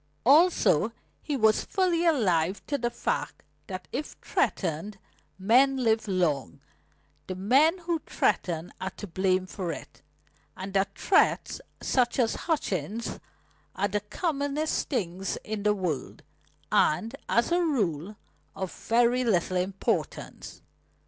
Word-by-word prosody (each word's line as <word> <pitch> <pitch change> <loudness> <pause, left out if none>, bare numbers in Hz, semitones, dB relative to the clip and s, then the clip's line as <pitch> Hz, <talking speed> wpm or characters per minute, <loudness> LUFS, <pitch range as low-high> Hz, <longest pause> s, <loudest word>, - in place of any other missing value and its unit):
Also, 320 +8 +4 0.3
he 290 -3 -2
was 220 -2 +3
fully 350 -3 +1
alive 190 - +2
to 290 - -2
the 240 -3 0
fact 240 - -3 0.2
that 185 -2 -6
if 300 - -4
threatened 185 +3 -1 0.4
men 255 +8 +4
live 225 -3 +1
long, 155 - 0 0.7
the 185 - -4
men 270 - +4
who 340 -2 -2
threaten 170 -1 0
are 190 - -2
to 205 - -9
blame 185 0 +1
for 185 -2 -4
it, - - -9 0.6
and 190 +1 -6
that 195 0 0
threats 405 +3 +2 0.2
such 245 -2 +1
as 235 -4 +2
Hutchings' 225 - -2 0.6
are 200 +2 +1
the 210 - 0
commonest 285 - -2
things 190 - -2
in 215 -1 -4
the 210 0 +2
world, 170 -9 -4 0.5
and, 225 - +2
as 235 +7 +2
a 350 +1 +3
rule, 210 - -1 0.4
of 190 -2 -4
very 240 +2 +2
little 185 -5 +1
importance. 190 +2 -3
210 Hz, 125 wpm, -27 LUFS, 185-275 Hz, 0.7 s, Also